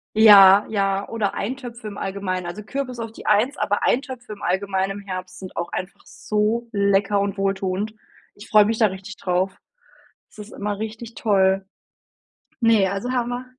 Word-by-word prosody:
Ja, 205 -2 +8
ja 195 -1 0
oder 215 -4 -1
Eintöpfe 240 -1 -5
im 205 - -8
Allgemeinen. 190 -2 -3
Also 185 +5 -6
Kürbis 255 +1 -5
auf 225 -1 -5
die - - -13
1, 220 +7 +2
aber 205 - -1
Eintöpfe 250 -3 -1
im 205 - -13
Allgemeinen 195 +1 -1
im - - -19
Herbst 185 -1 -6
sind 185 -1 -9
auch 170 0 -3
einfach 185 +1 -6
so 215 +3 -1
lecker 200 -1 +2
und 200 0 -2
wohltuend. 195 +1 -1 0.4
Ich 205 - -13
freue 210 -1 +6
mich 225 +1 -1
da 220 - +5
richtig 190 +2 -8
drauf. 185 +1 -1 0.7
Das - - -22
ist 210 +1 -9
immer 205 0 -3
richtig 220 +2 -6
toll. 195 -3 +2 0.9
Ne, 225 -5 +4
also 200 +6 -3
Hammer. 245 0 -2
205 Hz, 170 wpm, -22 LUFS, 195-225 Hz, 0.9 s, Ja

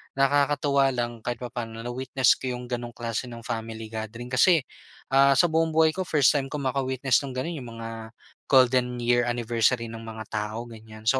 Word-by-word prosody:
nakakatuwa 140 0 +3
lang 120 -1 -3
kahit 120 0 -3
papaano 115 -2 -6
na-witness 130 +1 +1
ko 130 -1 -3
'yong 125 0 -7
gano'ng 120 0 -4
klase 115 +1 -3
nung 115 -1 -9
family 115 -2 -5
gathering. 115 +3 -6
Kasi 160 +2 +4 0.5
ah, 135 0 +5
sa 175 +2 +4
buong 160 0 +1
buhay 160 0 +5
ko 185 +1 -4
first 145 -4 +4
time 140 -2 -1
ko 150 - -7
maka-witness 130 -2 +1
nung 130 - -7
gano'n, 155 +4 -3
'yong 125 - -9
mga 115 0 -6 0.6
golden 125 -2 +3
year 120 0 +2
anniversary 115 0 0
nung 115 0 -9
mga 110 0 -6
tao, 110 +2 -3
ganyan. 110 -2 -12
So, 130 +4 +3
125 Hz, 180 wpm, -26 LUFS, 115-135 Hz, 0.6 s, ah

